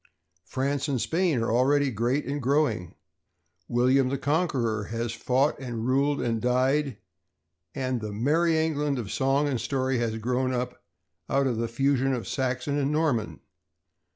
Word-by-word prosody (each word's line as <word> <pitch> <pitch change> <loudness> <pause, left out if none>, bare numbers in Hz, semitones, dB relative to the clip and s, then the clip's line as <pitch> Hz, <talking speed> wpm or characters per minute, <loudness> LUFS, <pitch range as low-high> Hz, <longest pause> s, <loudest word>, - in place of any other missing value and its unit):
France 140 +2 -1
and 135 -3 0
Spain 160 +7 +1
are 115 - -1
already 135 +3 +3
great 120 +6 0
and 145 +1 -3
growing. 135 - 0 0.7
William 130 +2 +3
the 140 - -1
Conqueror 135 - 0
has 115 +2 -3
fought 130 +5 +1
and 120 -4 -4
ruled 140 +3 +2
and 115 -2 -1
died, 130 +1 +1 0.8
and 130 -2 -2
the 105 -1 -4
"Merry 160 +10 +2
England" 150 -3 0
of 110 -5 -4
song 135 +2 +1
and 130 -5 -1
story 130 +2 0
has 115 -2 -1
grown 125 +3 0
up 125 0 -4 0.5
out 140 0 +2
of 125 -4 0
the 115 +1 -1
fusion 135 +2 +1
of 120 - -5
Saxon 130 +2 -1
and 140 0 0
Norman. 125 - 0
130 Hz, 155 wpm, -27 LUFS, 120-140 Hz, 0.8 s, already